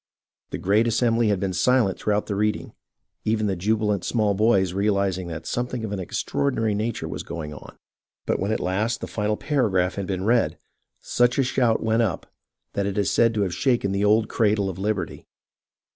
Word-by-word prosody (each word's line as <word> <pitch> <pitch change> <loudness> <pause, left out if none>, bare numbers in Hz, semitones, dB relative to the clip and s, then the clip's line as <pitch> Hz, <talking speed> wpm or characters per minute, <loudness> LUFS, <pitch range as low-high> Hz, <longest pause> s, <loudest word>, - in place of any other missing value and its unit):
The - - -4
great 105 +5 +2
assembly 115 0 +2
had 100 -3 +1
been 95 -1 -2
silent 105 +1 +2
throughout 105 0 0
the 105 - -3
reading, 105 +1 -1 0.5
even 110 0 0
the 100 -2 0
jubilant 105 +1 0
small 105 -4 +1
boys 95 -3 +2
realizing 100 -2 0
that 80 -1 -6
something 120 -1 -2
of 105 - -5
an 100 - -3
extraordinary 110 +4 -1
nature 110 +3 -2
was - - -5
going 80 -3 -6
on; - - -12 0.5
but - - 0
when 100 +3 -1
at 110 - 0
last 105 +6 -1
the - - -3
final 105 0 -1
paragraph 100 -11 +1
had 100 -2 -3
been 95 -1 -2
read, 115 +1 +2 0.4
such 120 0 +2
a 135 - +4
shout 125 -3 +1
went 110 +1 +2
up 95 -9 -1 0.5
that 100 0 -1
it 100 - -3
is 100 -1 +1
said 115 -1 +3
to 105 - +1
have 90 -3 -2
shaken 120 -6 +1
the 100 +1 0
old 110 +1 +4
"Cradle 105 -3 +1
of 95 - -10
Liberty." 105 0 -3
105 Hz, 190 wpm, -24 LUFS, 95-115 Hz, 0.5 s, a